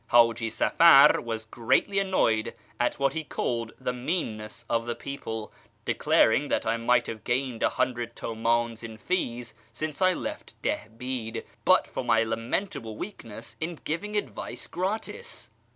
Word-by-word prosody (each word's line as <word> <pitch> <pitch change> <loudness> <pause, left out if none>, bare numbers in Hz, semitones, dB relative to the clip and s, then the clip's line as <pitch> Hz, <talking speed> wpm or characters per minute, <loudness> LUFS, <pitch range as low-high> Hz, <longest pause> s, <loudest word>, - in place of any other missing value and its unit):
Haji 115 -1 +4
Safar 140 +5 +7
was 110 -1 -4
greatly 120 - +1
annoyed 120 - +1 0.2
at 120 - +1
what 140 -1 +1
he 160 0 -2
called 115 -6 -2
the 125 -1 -2
meanness 120 -5 -3
of 115 0 0
the 120 - -1
people, 110 -6 -6 0.3
declaring 135 +6 +3
that - - 0
I 110 +1 +2
might 120 +1 +3
have 110 -1 -6
gained 125 -1 -1
a - - +4
hundred 120 -2 -1
Hmdns 115 0 0
in 110 -1 -7
fees 120 -6 -2 0.2
since 155 +2 -4
I 185 0 +5
left - - -6
Dilibid 115 +1 -3 0.2
but - - +5
for - - -4
my 115 0 +4
lamentable 115 - -2
weakness 115 - -8
in 170 +2 -2
giving 210 +7 -2
advice 205 - -4
gratis. 220 - -4
120 Hz, 145 wpm, -27 LUFS, 115-150 Hz, 0.3 s, Safar